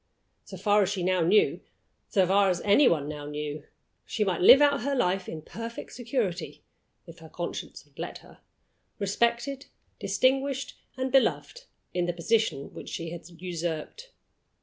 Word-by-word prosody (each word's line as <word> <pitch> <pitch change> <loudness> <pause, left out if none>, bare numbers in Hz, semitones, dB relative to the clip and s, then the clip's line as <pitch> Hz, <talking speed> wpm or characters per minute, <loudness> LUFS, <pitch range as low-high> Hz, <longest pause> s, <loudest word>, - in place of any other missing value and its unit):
So - - -9
far 210 -1 +3
as 190 - +2
she 195 -3 -2
now 185 0 +2
knew 190 +6 +3 0.5
so 190 -2 +3
far 195 +2 +4
as 180 -1 0
any 210 +7 +5
one 150 -4 +1
now 150 -1 -6
knew 150 0 -5 0.4
she 215 - -1
might 190 -4 -1
live 255 +9 +9
out 285 -3 +4
her 280 +3 -1
life 190 -6 0
in 155 -1 -7
perfect 230 +5 -7
security 230 -7 -3 0.4
(if - - -13
her - - -13
conscience - - -6
would - - -22
let - - -5
her), - - -17 0.6
respected, 235 +7 0 0.3
distinguished, 270 +1 0 0.2
and 260 0 -2
beloved, 380 - +1 0.3
in 175 -1 0
the 175 - -1
position 175 -4 0
which - - -9
she 165 -1 -5
had 170 0 -9
usurped. 175 - -5
200 Hz, 160 wpm, -27 LUFS, 175-250 Hz, 0.6 s, live